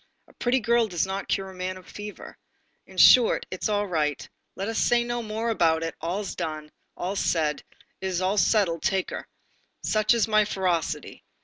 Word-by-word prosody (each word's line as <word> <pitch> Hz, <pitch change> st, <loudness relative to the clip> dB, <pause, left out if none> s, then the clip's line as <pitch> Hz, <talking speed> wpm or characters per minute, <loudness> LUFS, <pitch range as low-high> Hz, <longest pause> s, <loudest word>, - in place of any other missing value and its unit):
A -, -, -21 dB
pretty 250 Hz, +2 st, +1 dB
girl 235 Hz, 0 st, +2 dB
does 175 Hz, -4 st, -1 dB
not 195 Hz, +1 st, -4 dB
cure 190 Hz, -1 st, -1 dB
a -, -, -13 dB
man 185 Hz, 0 st, -4 dB
of 185 Hz, -, -14 dB
fever. 210 Hz, 0 st, -9 dB, 0.5 s
In -, -, -15 dB
short, 250 Hz, -3 st, +6 dB
it's 185 Hz, -, -2 dB
all 205 Hz, -1 st, +1 dB
right, 150 Hz, -6 st, -1 dB, 0.3 s
let 195 Hz, -, -4 dB
us 225 Hz, -1 st, -1 dB
say 240 Hz, 0 st, +3 dB
no 240 Hz, 0 st, -3 dB
more 220 Hz, +1 st, -2 dB
about 165 Hz, -6 st, +2 dB
it, 165 Hz, -, -3 dB
all's 185 Hz, +5 st, -2 dB
said, 155 Hz, -3 st, -5 dB, 0.3 s
all's 190 Hz, +3 st, -1 dB
done, 155 Hz, -3 st, 0 dB, 0.4 s
it's 190 Hz, -2 st, -1 dB
all 190 Hz, +3 st, +1 dB
settled, 185 Hz, -8 st, +2 dB
take 190 Hz, -1 st, 0 dB
her. -, -, -6 dB, 0.6 s
Such 215 Hz, +2 st, +2 dB
is 230 Hz, -2 st, +2 dB
my 215 Hz, -1 st, +4 dB
ferocity. 185 Hz, -5 st, -2 dB
195 Hz, 185 wpm, -26 LUFS, 175-215 Hz, 0.6 s, short